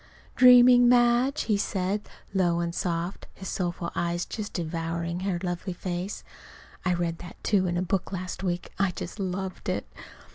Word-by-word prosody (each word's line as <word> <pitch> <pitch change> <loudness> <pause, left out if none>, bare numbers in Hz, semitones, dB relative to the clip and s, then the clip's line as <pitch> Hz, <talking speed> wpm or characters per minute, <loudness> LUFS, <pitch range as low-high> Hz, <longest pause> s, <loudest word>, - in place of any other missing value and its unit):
"Dreaming, 250 -1 +8
Madge?" 245 +3 +4
he 210 -3 +1
said, 200 +1 -2 0.2
low 175 -3 +2
and 170 0 -2
soft, 175 +1 -3
his 190 - -7
soulful 175 -2 -2
eyes 175 0 -1
just 210 -2 -5
devouring 170 0 -3
her 190 -1 -1
lovely 180 +1 -3
face. 180 +2 -4 0.6
(I 180 -1 +2
read 170 -1 -2
that, 175 - -9
too, 190 -3 +2
in 175 0 -1
a 180 - 0
book 185 +1 -1
last 185 -1 -5
week. 180 -2 -2
I 195 -1 +3
just 180 +3 -7
loved 190 0 -3
it!) - - -1
185 Hz, 160 wpm, -27 LUFS, 175-200 Hz, 0.6 s, Dreaming